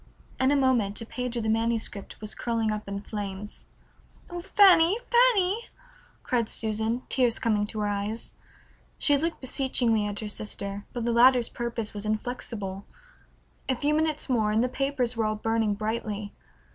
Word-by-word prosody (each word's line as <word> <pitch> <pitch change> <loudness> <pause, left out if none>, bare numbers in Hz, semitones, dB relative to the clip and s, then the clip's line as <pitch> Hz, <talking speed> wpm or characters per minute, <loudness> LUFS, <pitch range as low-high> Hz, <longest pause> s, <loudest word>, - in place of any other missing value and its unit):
In 260 0 +3
a 290 - +4
moment 245 -7 +2
a - - -5
page 250 +1 -4
of 235 - -1
the 220 - 0
manuscript 225 -2 -1
was 215 -1 -4
curling 230 -2 -1
up 215 -1 -4
in 200 0 -4
flames. 205 -1 -6 0.6
"Oh, 350 0 -4
Fanny, 380 -1 +6
Fanny!" 465 -3 +4 0.6
cried 235 -3 0
Susan, 220 +3 -1
tears 245 -3 +2
coming 210 -2 +1
to 215 0 -3
her - - 0
eyes. 205 +2 -3 0.6
She 290 - +5
looked 330 +4 -1
beseechingly 245 -5 +1
at 205 0 -3
her 215 - -4
sister, 205 -1 -4
but 240 -2 -4
the 235 - +1
latter's 245 0 +5
purpose 235 -2 -4
was 205 0 -4
inflexible. 215 -3 -4 0.9
A 260 - +2
few 290 +4 0
minutes 310 -1 0
more 225 -5 +2
and 220 +2 +2
the 250 - 0
papers 260 -2 -1
were 225 - 0
all 215 0 0
burning 225 -1 0
brightly. 215 -1 -3
230 Hz, 165 wpm, -27 LUFS, 210-260 Hz, 0.9 s, Fanny